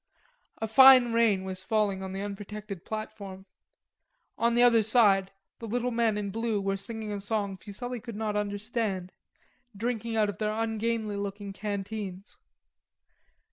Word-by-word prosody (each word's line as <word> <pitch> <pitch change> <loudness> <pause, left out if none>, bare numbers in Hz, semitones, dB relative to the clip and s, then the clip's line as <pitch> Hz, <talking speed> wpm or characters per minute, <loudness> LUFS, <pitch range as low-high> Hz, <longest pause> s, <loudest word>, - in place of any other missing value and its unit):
A 220 - -3
fine 255 0 +8
rain 225 -5 +3
was 185 -1 -4
falling 205 -2 0
on 190 0 -5
the 195 +1 -4
unprotected 205 -2 -7
platform. 200 -3 -7 0.9
On 235 0 +1
the 240 - +5
other 235 -2 +6
side 200 -4 +4 0.3
the 230 - -6
little 245 +3 -1
men 230 -2 +1
in 200 -1 -3
blue 225 0 -1
were 195 0 -1
singing 220 +1 -5
a 205 -1 -4
song 205 -1 -1
Fuselli 240 +6 -6
could 230 -1 -8
not 215 -1 -2
understand, 205 -2 -2 0.7
drinking 230 0 -2
out 215 -1 +3
of 205 -4 -5
their 215 0 0
ungainly 225 -1 -1
looking 200 0 -5
canteens. 200 -1 -5
210 Hz, 145 wpm, -28 LUFS, 200-230 Hz, 0.9 s, fine